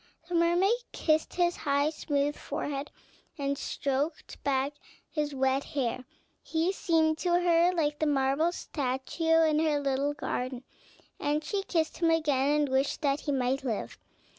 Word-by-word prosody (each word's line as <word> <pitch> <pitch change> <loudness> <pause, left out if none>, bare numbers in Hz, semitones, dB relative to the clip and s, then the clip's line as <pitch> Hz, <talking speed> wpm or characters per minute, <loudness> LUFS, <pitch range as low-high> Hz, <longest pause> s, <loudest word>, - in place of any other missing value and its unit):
The 355 - -6
mermaid 345 +4 +3 0.2
kissed 310 -1 +1
his 350 -1 +2
high, 285 +1 +1
smooth 290 -2 -1
forehead, 285 0 -4 0.5
and 280 -1 -1
stroked 280 +3 -3
back 275 0 +1 0.4
his 295 -2 -2
wet 265 +1 +1
hair; 255 -2 -2 0.4
he 330 +3 0
seemed 320 -4 +1
to 350 -1 +2
her 345 0 +4
like 300 -4 0
the 310 - +1
marble 280 +3 +2
statue 320 +3 0
in 305 -1 +2
her 310 -2 +2
little 280 +1 0
garden, 255 -2 -3 0.6
and 295 +1 0
she 395 +6 -1
kissed 325 -4 -1
him 335 -1 +3
again, 295 -2 +2
and 290 - 0
wished 270 +4 0
that 280 0 +2
he 290 - -3
might 265 0 0
live. 230 -5 -3
295 Hz, 150 wpm, -29 LUFS, 275-325 Hz, 0.6 s, her